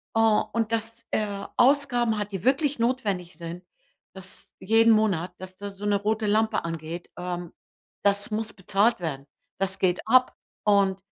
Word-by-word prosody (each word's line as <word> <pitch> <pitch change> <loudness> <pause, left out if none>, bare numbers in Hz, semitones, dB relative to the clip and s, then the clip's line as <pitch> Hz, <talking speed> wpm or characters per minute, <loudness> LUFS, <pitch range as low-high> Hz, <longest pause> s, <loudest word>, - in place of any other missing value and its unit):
Hm, 225 -1 +4
und 230 -1 0
dass 230 +1 -3
er 200 -2 -2
Ausgaben 245 -4 +3
hat, 205 0 -4
die 190 -2 -5
wirklich 275 +1 +2
notwendig 205 -9 -1
sind, 170 +1 -7 0.5
dass 190 -1 -10
jeden 225 +3 +5
Monat, 185 -5 +1
dass 185 0 -9
da 205 0 -6
so 200 +1 -8
'ne 205 - +3
rote 215 +1 0
Lampe 220 -1 +2
angeht, 165 +1 -5
ähm, 175 -1 -5 0.5
das 200 +1 +2
muss 215 +1 -2
bezahlt 200 +3 +2
werden. 140 -5 -4 0.3
Das 195 0 -1
geht 180 -1 +2
ab. 255 +2 +4 0.3
Und, 200 -2 +3
205 Hz, 155 wpm, -26 LUFS, 185-225 Hz, 0.5 s, jeden